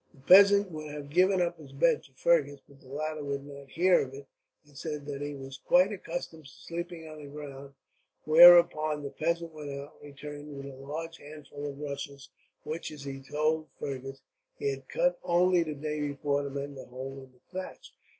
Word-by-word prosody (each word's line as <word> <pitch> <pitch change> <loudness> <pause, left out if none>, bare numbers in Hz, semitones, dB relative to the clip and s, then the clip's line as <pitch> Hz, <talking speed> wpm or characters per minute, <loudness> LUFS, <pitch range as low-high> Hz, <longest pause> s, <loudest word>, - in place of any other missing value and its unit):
The - - -20
peasant 200 +5 +7
would 155 -1 -6
have 145 -1 -8
given 185 +3 +4
up 170 -1 -3
his 140 -3 -13
bed 235 - +3
to 135 - -20
Fergus, 145 -2 +2
but 140 -1 -19
the - - -18
latter 155 +2 -4
would 140 -1 -3
not 140 -1 -11
hear 180 +5 +4
of 135 0 -6
it, 140 0 -10 0.4
and 145 -1 -22
said 150 0 -5
that 145 -1 -5
he 145 0 -4
was 135 0 -9
quite 180 +7 +4
accustomed 165 -4 -6
to - - -11
sleeping 170 0 -7
on 155 -1 -10
the 145 - -9
ground; 140 -1 -9 0.5
whereupon 155 -2 +7
the 140 - -5
peasant 170 0 -2
went 150 -2 -7
out, 140 +1 -7
and 145 - -11
returned 145 0 -9
with 140 - -7
a 140 -1 -8
large 155 +5 -7
armful 145 -1 -8
of 140 - -8
rushes; 140 -2 -6 0.3
which, 155 +2 -4
as 150 -2 -10
he 135 -1 -6
told 155 +3 0
Fergus, 135 -1 -5 0.4
he 425 -2 0
had - - -8
cut - - +1
only 180 +1 +4
the 155 -2 -3
day 150 +1 -3
before 140 0 -1
to 140 - -4
mend 140 0 -5
a - - -8
hole 135 +2 -7
in 130 -1 -15
the 125 - -26 0.2
thatch. - - -11
150 Hz, 205 wpm, -29 LUFS, 140-165 Hz, 0.5 s, peasant